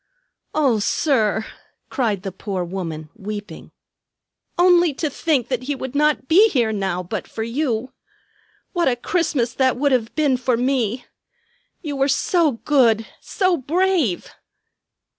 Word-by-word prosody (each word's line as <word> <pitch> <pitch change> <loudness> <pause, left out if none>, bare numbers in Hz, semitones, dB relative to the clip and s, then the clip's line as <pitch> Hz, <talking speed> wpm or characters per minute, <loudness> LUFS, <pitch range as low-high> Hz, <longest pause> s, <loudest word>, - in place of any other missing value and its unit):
"O 270 -8 +3
sir!" 220 -2 +1 0.5
cried 215 -8 -1
the 195 - -4
poor 190 0 -4
woman, 165 -4 -6
weeping. 205 +1 -8 0.9
"Only 350 -3 +4
to 305 0 -2
think 275 -5 0
that 255 -1 -2
he 290 - 0
would 260 -1 -6
not 300 -2 +1
be 400 +9 +6
here 235 - +1
now 190 -3 -2
but 190 +3 -5
for 220 - -5
you. 240 0 -2 0.8
What 345 -4 +1
a 250 - +2
Christmas 260 - -1
that 260 -2 +1
would 285 +2 +1
have 240 -3 0
been 290 -4 +2
for 250 -1 0
me! 245 -2 0 0.8
You 295 -3 -4
were 270 0 +2
so 310 +2 +2
good, 230 -3 +2
so 370 -3 0
brave!" 325 - 0
255 Hz, 140 wpm, -21 LUFS, 220-300 Hz, 0.9 s, be